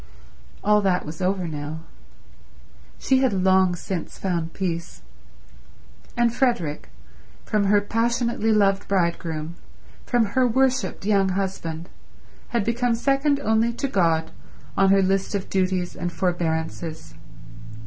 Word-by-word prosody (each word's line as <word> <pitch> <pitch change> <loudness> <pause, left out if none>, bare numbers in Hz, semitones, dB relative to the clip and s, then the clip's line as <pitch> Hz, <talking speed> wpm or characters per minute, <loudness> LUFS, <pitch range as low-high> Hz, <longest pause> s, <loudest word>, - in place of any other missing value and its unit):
All 210 +1 +4
that 185 -2 +1
was 155 +4 -7
over 185 -1 0
now. 150 0 -5 1.2
She 265 - +2
had 260 -4 +2
long 190 -1 +3
since 175 0 -5
found 170 -3 -2
peace. 170 -3 -4 1.1
And 240 -1 +3
Frederick, 215 - 0 0.6
from 210 -2 +1
her 205 +1 +4
passionately 230 +1 0
loved 200 -2 +2
bridegroom, 170 -3 -1 0.5
from 240 -2 +3
her 255 -1 +4
worshipped 255 -3 0
young 200 -2 +3
husband, 185 -4 -3 0.6
had 235 -3 0
become 235 +2 +1
second 275 +4 +1
only 220 -1 +2
to 275 - -2
God 165 -8 +1 0.4
on 195 0 +4
her 195 0 +5
list 195 +2 0
of 195 - -4
duties 185 -2 0
and 175 0 -3
forbearances. 165 -2 -2
195 Hz, 120 wpm, -24 LUFS, 170-230 Hz, 1.2 s, her